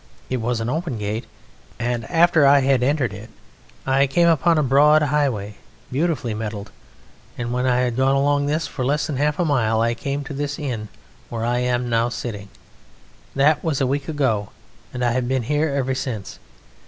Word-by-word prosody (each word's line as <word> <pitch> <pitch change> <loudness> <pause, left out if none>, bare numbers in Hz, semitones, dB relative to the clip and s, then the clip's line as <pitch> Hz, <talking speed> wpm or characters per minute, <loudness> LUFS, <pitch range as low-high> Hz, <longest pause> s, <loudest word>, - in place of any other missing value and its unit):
It 130 - +1
was 120 0 -1
an 115 - -3
open 155 -1 -2
gate, 105 +2 -4 0.5
and 120 -1 -3
after 170 -2 +4
I 140 0 +6
had 135 -1 +2
entered 130 -4 +1
it 105 +3 -10 0.6
I 135 +1 +3
came 170 +6 +3
upon 165 0 +3
a 155 - +3
broad 150 +3 +5
highway, 135 -9 -1 0.3
beautifully 140 -5 -1
metalled, 105 -1 -5 0.7
and 120 0 -3
when 125 +1 0
I 125 0 +2
had 125 -1 -1
gone 135 +1 +3
along 145 +1 +2
this 155 +3 0
for 130 - -5
less 145 +4 +1
than 145 - -3
half 150 +1 +1
a 175 - +1
mile 115 -7 +1
I 115 +1 +2
came 140 +4 -4
to 140 - -7
this 145 0 -3
inn 125 -9 -4 0.4
where 115 -1 -3
I 120 +1 +1
am 125 0 0
now 115 0 +1
sitting. 105 -5 -6 0.9
That 145 +2 +3
was 155 -5 0
a 135 - +2
week 140 +2 -2
ago, 130 -10 0 0.4
and 125 -1 -2
I 120 - +2
have 125 0 -1
been 130 -1 0
here 150 +6 0
ever 135 -2 -1
since. 130 -6 -5
130 Hz, 190 wpm, -22 LUFS, 120-145 Hz, 0.9 s, I